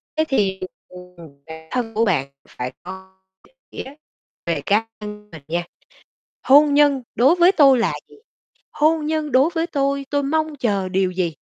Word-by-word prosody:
Thế 315 0 +1
thì, 195 -7 0 0.3
ừm, 180 0 -14 0.3
bản 160 0 -11
thân 235 -3 -3
của 225 +2 +1
bạn 140 -9 0 0.2
phải 125 +1 -6
có 190 +1 -11 0.3
định - - -33 0.2
nghĩa 275 +2 -8 0.5
về 165 -4 -1
cá 215 +3 +1
nhân 210 0 -9
mình 160 -4 -12
nha, 170 +2 -2 0.8
hôn 285 +2 +5
nhân 285 -3 +3
đối 270 +8 +4
với 355 +2 +5
tôi 275 -7 +5
là 230 - +1 0.2
gì? - - -18 0.6
Hôn 310 0 +1
nhân 310 -3 -2
đối 270 +6 +4
với 325 +1 0
tôi, 280 -3 -1
tôi 285 -1 0
mong 310 +1 -1
chờ 200 -7 -1
điều 185 0 0
gì? 180 -2 -1
240 Hz, 175 wpm, -21 LUFS, 190-290 Hz, 0.8 s, hôn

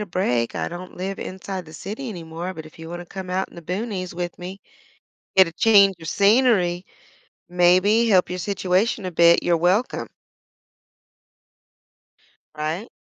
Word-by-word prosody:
a 210 - -4
break, 125 -11 -1
I - - -2
don't 180 +1 -9
live 195 +2 -4
inside 185 -1 -6
the 155 - -13
city 220 - -6
anymore, 170 -1 -6
but 160 - -8
if 155 - -15
you 165 0 -9
wanna 175 +1 -7
come 190 +1 -8
out 185 +1 -2
in - - -18
the 170 - -9
boonies 185 0 -4
with 175 -1 -5
me, 185 +3 -8 0.8
get 190 -2 +8
a 165 - -7
change 200 -1 +5
of 160 - -8
scenery, 200 -5 +3 0.7
maybe 185 +6 +4
help 185 -3 +3
your 180 - -3
situation 195 +2 0
a 185 - -3
bit, 170 0 +5
you're 170 -1 +2
welcome. 185 +8 +1 2.5
Right? 160 +8 -3
185 Hz, 155 wpm, -23 LUFS, 175-200 Hz, 2.5 s, get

